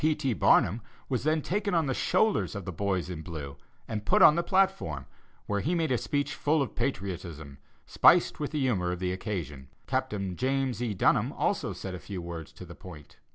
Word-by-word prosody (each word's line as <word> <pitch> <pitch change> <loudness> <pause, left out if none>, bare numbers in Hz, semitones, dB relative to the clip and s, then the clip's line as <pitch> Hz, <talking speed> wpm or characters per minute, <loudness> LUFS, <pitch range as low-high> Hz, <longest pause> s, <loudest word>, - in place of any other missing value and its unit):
P. 155 0 +3
T. 135 -4 -1
Barnum 110 +1 +3 0.3
was 130 0 -1
then 155 -1 +2
taken 200 0 -1
on 165 -2 +2
the 135 - 0
shoulders 215 - +1
of 100 - -5
the 90 - -4
boys 95 0 -1
in 90 -3 -6
blue, 75 -5 -7 0.3
and 105 -2 -4
put - - +4
on - - +9
the 170 - +1
platform, 185 - +1 0.4
where 100 0 -1
he 160 - 0
made 160 -4 0
a 125 - +3
speech 145 +4 -1
full 155 +2 +1
of 140 - -1
patriotism, 85 - -4 0.3
spiced 175 - +4
with 150 - -2
the 155 - -2
humor 100 -10 +1
of 90 - -3
the 90 0 -2
occasion. 85 - -5 0.2
Captain 105 -8 -2
James 130 0 -1
E. 115 -4 -1
Dunham - - +2
also - - -1
said 95 - -6
a 90 - -6
few 95 +2 -7
words 85 -2 -7
to - - -10
the - - -10
point.... 75 -6 -13
105 Hz, 205 wpm, -28 LUFS, 90-145 Hz, 0.4 s, on